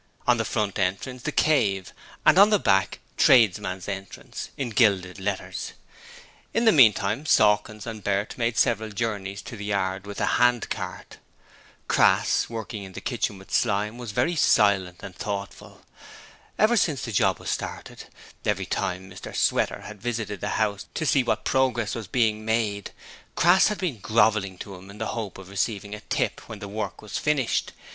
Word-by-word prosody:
On -, -, +4 dB
the -, -, -1 dB
front 105 Hz, -3 st, -1 dB
entrance 100 Hz, +7 st, -2 dB
'The 150 Hz, -, -3 dB
Cave' 100 Hz, -, +1 dB, 0.3 s
and -, -, +6 dB
on 205 Hz, +1 st, +8 dB
the 210 Hz, -, +4 dB
back 95 Hz, -, +2 dB, 0.2 s
'Tradesmens 100 Hz, -7 st, +3 dB
Entrance', 100 Hz, -1 st, -7 dB
in 130 Hz, -4 st, -3 dB
gilded 100 Hz, -5 st, +2 dB
letters. 100 Hz, 0 st, -4 dB, 0.8 s
In 230 Hz, -, +2 dB
the 225 Hz, -, +7 dB
meantime, 115 Hz, -, +4 dB
Sawkins 105 Hz, -1 st, +3 dB
and 110 Hz, -3 st, -7 dB
Bert 100 Hz, +1 st, -1 dB
made 115 Hz, -1 st, -1 dB
several 110 Hz, -1 st, +2 dB
journeys 100 Hz, -2 st, -3 dB
to 115 Hz, -, -8 dB
the 105 Hz, -1 st, -7 dB
Yard 100 Hz, -1 st, -2 dB
with 100 Hz, -, -7 dB
the -, -, +1 dB
hand 125 Hz, -1 st, +2 dB
cart. -, -, -6 dB, 0.7 s
Crass -, -, +3 dB
working 110 Hz, -2 st, -6 dB
in 95 Hz, -1 st, -10 dB
the -, -, -6 dB
kitchen 115 Hz, -5 st, -2 dB
with 95 Hz, -, -13 dB
Slyme 105 Hz, +1 st, 0 dB
was 120 Hz, -4 st, -6 dB
very 125 Hz, +11 st, 0 dB
silent 95 Hz, -, +3 dB
and 90 Hz, -, -8 dB
thoughtful. 100 Hz, 0 st, -6 dB, 0.7 s
Ever 225 Hz, +3 st, +4 dB
since 155 Hz, -8 st, +1 dB
the 115 Hz, -, -5 dB
job 105 Hz, -, +2 dB
was -, -, -4 dB
started, -, -, -6 dB, 0.4 s
every -, -, 0 dB
time 90 Hz, +1 st, -3 dB
Mr 95 Hz, -, -9 dB
Sweater -, -, +1 dB
had 105 Hz, -2 st, -10 dB
visited 110 Hz, -4 st, -3 dB
the -, -, -2 dB
house 100 Hz, -2 st, -1 dB
to 160 Hz, -, -1 dB
see 145 Hz, -2 st, +4 dB
what 110 Hz, -3 st, -1 dB
progress 125 Hz, -5 st, +1 dB
was 115 Hz, -4 st, -5 dB
being 110 Hz, -1 st, +1 dB
made, 110 Hz, -3 st, -1 dB, 0.5 s
Crass 175 Hz, +3 st, +5 dB
had 210 Hz, -, -1 dB
been 160 Hz, -, -3 dB
grovelling 105 Hz, -3 st, +2 dB
to 100 Hz, -, -8 dB
him 95 Hz, +1 st, -12 dB
in 100 Hz, -, -11 dB
the 110 Hz, -, -3 dB
hope 110 Hz, -4 st, -5 dB
of 95 Hz, -1 st, -11 dB
receiving 100 Hz, +1 st, -2 dB
a 105 Hz, -, -6 dB
tip -, -, -2 dB
when 110 Hz, -, -7 dB
the 100 Hz, 0 st, -8 dB
work 100 Hz, -2 st, -5 dB
was 105 Hz, -, -4 dB
finished. 145 Hz, -6 st, 0 dB
105 Hz, 175 wpm, -25 LUFS, 100-120 Hz, 0.8 s, on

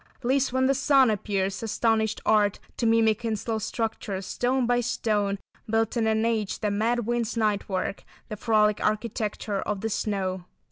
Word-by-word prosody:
"Leaves 265 Hz, +2 st, +2 dB
when 260 Hz, +1 st, +2 dB
the 270 Hz, -, +4 dB
sun 275 Hz, -3 st, +4 dB
appears, 195 Hz, -2 st, -1 dB
astonished 220 Hz, 0 st, 0 dB
Art 210 Hz, -2 st, +3 dB, 0.2 s
To 235 Hz, -, +1 dB
mimic 225 Hz, 0 st, +3 dB
in 225 Hz, -2 st, 0 dB
slow 220 Hz, +1 st, -3 dB
structures, 215 Hz, -3 st, -3 dB
stone 250 Hz, +5 st, 0 dB
by 245 Hz, +1 st, +2 dB
stone, 210 Hz, -4 st, 0 dB, 0.3 s
Built 225 Hz, +1 st, +1 dB
in 225 Hz, -2 st, +1 dB
an 220 Hz, 0 st, +2 dB
age, 220 Hz, -3 st, 0 dB
the 210 Hz, -2 st, -1 dB
mad 230 Hz, +3 st, 0 dB
wind's 240 Hz, 0 st, -1 dB
night 210 Hz, -3 st, 0 dB
work, 190 Hz, 0 st, -2 dB, 0.2 s
The 215 Hz, -, -5 dB
frolic 210 Hz, -1 st, +2 dB
Architecture 215 Hz, -2 st, -1 dB
of 205 Hz, -2 st, -3 dB
the 225 Hz, -, -1 dB
snow." 190 Hz, -4 st, -2 dB
220 Hz, 170 wpm, -26 LUFS, 205-235 Hz, 0.3 s, the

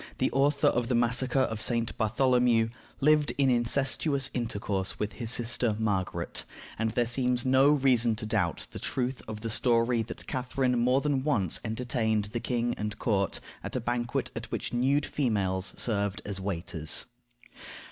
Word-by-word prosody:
the -, -, +1 dB
author 140 Hz, +1 st, +2 dB
of 120 Hz, -1 st, 0 dB
the 125 Hz, -, +1 dB
massacre 125 Hz, +3 st, +2 dB
of 110 Hz, -4 st, -1 dB
St. 115 Hz, -1 st, +1 dB
Bartholomew, 120 Hz, 0 st, +2 dB, 0.3 s
lived 150 Hz, +1 st, +3 dB
in 135 Hz, -2 st, +3 dB
incestuous 135 Hz, +3 st, +2 dB
intercourse 100 Hz, -5 st, -2 dB
with 105 Hz, +1 st, -3 dB
his 115 Hz, -3 st, -5 dB
sister 120 Hz, -2 st, +2 dB
Margaret, 100 Hz, -4 st, -2 dB, 0.4 s
and 115 Hz, 0 st, +1 dB
there 120 Hz, +2 st, +1 dB
seems 125 Hz, +1 st, +1 dB
no 130 Hz, +2 st, +5 dB
reason 130 Hz, -6 st, +3 dB
to 110 Hz, -, -3 dB
doubt 105 Hz, -7 st, -1 dB
the -, -, -7 dB
truth 130 Hz, 0 st, -2 dB
of 105 Hz, -1 st, -6 dB
the 115 Hz, -, -3 dB
story 115 Hz, 0 st, +2 dB
that 110 Hz, -, -7 dB
Catharine 125 Hz, -1 st, -1 dB
more 125 Hz, +3 st, +3 dB
than 140 Hz, -3 st, 0 dB
once 110 Hz, -, +1 dB
entertained 110 Hz, -2 st, -1 dB
the 120 Hz, -, -1 dB
king 120 Hz, 0 st, -1 dB
and 105 Hz, 0 st, -3 dB
court 100 Hz, -6 st, 0 dB, 0.2 s
at -, -, -5 dB
a -, -, +1 dB
banquet 120 Hz, 0 st, -2 dB
at -, -, -6 dB
which -, -, -4 dB
nude 135 Hz, +4 st, +2 dB
females 100 Hz, -8 st, -1 dB
served 100 Hz, -3 st, -2 dB
as 100 Hz, -2 st, -4 dB
waiters. 85 Hz, -4 st, -3 dB
120 Hz, 160 wpm, -28 LUFS, 110-130 Hz, 0.4 s, no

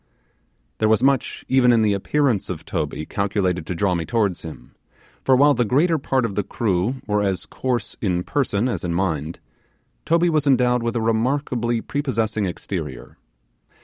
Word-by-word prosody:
There 110 Hz, -, +2 dB
was 110 Hz, +1 st, +3 dB
much 135 Hz, -2 st, +1 dB
even 130 Hz, -2 st, +4 dB
in 115 Hz, -2 st, +4 dB
the 105 Hz, -1 st, +3 dB
appearance 120 Hz, +2 st, 0 dB
of 85 Hz, -4 st, -5 dB
Toby 75 Hz, -2 st, -3 dB
calculated 95 Hz, -4 st, -1 dB
to 90 Hz, -, -3 dB
draw 95 Hz, +1 st, +1 dB
me 85 Hz, -2 st, -1 dB
towards 100 Hz, 0 st, 0 dB
him, 80 Hz, -2 st, -10 dB, 0.5 s
for 130 Hz, -, +4 dB
while 145 Hz, +3 st, +5 dB
the 120 Hz, -, +1 dB
greater 155 Hz, -, +2 dB
part 135 Hz, -2 st, 0 dB
of 105 Hz, -, -3 dB
the 105 Hz, -, 0 dB
crew 100 Hz, +2 st, -1 dB
were 105 Hz, -1 st, +1 dB
as 95 Hz, -2 st, -1 dB
coarse 125 Hz, -2 st, -3 dB
in 90 Hz, -4 st, 0 dB
person 120 Hz, -4 st, 0 dB
as 120 Hz, -, -3 dB
in 85 Hz, -1 st, -2 dB
mind, 85 Hz, -4 st, -1 dB, 0.7 s
Toby 170 Hz, +1 st, +3 dB
was 150 Hz, -2 st, +1 dB
endowed 125 Hz, -2 st, +3 dB
with 115 Hz, +1 st, -2 dB
a 115 Hz, -, 0 dB
remarkably 120 Hz, 0 st, 0 dB
prepossessing 110 Hz, -8 st, -1 dB
exterior. 90 Hz, -, -6 dB
110 Hz, 170 wpm, -22 LUFS, 95-130 Hz, 0.7 s, while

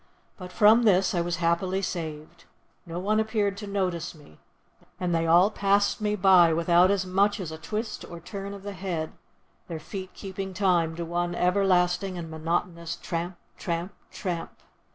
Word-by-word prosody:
But 180 Hz, -2 st, -9 dB
from 215 Hz, +4 st, +6 dB
this 195 Hz, -4 st, +3 dB
I 175 Hz, -, +1 dB
was 175 Hz, 0 st, -1 dB
happily 180 Hz, +3 st, 0 dB
saved; 160 Hz, -2 st, -5 dB, 0.4 s
no 165 Hz, 0 st, -5 dB
one 210 Hz, +4 st, +1 dB
appeared 215 Hz, -2 st, 0 dB
to 205 Hz, 0 st, -7 dB
notice 180 Hz, -4 st, -2 dB
me, 145 Hz, -, -18 dB, 0.6 s
and 180 Hz, -1 st, -1 dB
they 165 Hz, 0 st, +1 dB
all 175 Hz, +5 st, +5 dB
passed 200 Hz, +1 st, +2 dB
me 210 Hz, 0 st, +1 dB
by 185 Hz, -4 st, +6 dB
without 170 Hz, +2 st, +4 dB
as 195 Hz, -2 st, +1 dB
much 200 Hz, +3 st, +2 dB
as 175 Hz, -5 st, -5 dB
a 160 Hz, -, -7 dB
twist 215 Hz, +6 st, -4 dB
or 170 Hz, -, -8 dB
turn 200 Hz, +3 st, -7 dB
of 195 Hz, -, -11 dB
the 205 Hz, 0 st, -5 dB
head, 175 Hz, -4 st, -3 dB, 0.6 s
their 165 Hz, -2 st, -5 dB
feet 185 Hz, +4 st, -8 dB
keeping 190 Hz, -1 st, -6 dB
time 175 Hz, -4 st, +2 dB
to 170 Hz, 0 st, -4 dB
one 175 Hz, +1 st, -2 dB
everlasting 180 Hz, 0 st, +2 dB
and 165 Hz, -2 st, -6 dB
monotonous 170 Hz, +1 st, -2 dB
tramp, 175 Hz, +1 st, -4 dB, 0.2 s
tramp, 170 Hz, +1 st, -3 dB, 0.2 s
tramp. 170 Hz, -3 st, -4 dB
180 Hz, 170 wpm, -27 LUFS, 170-195 Hz, 0.6 s, from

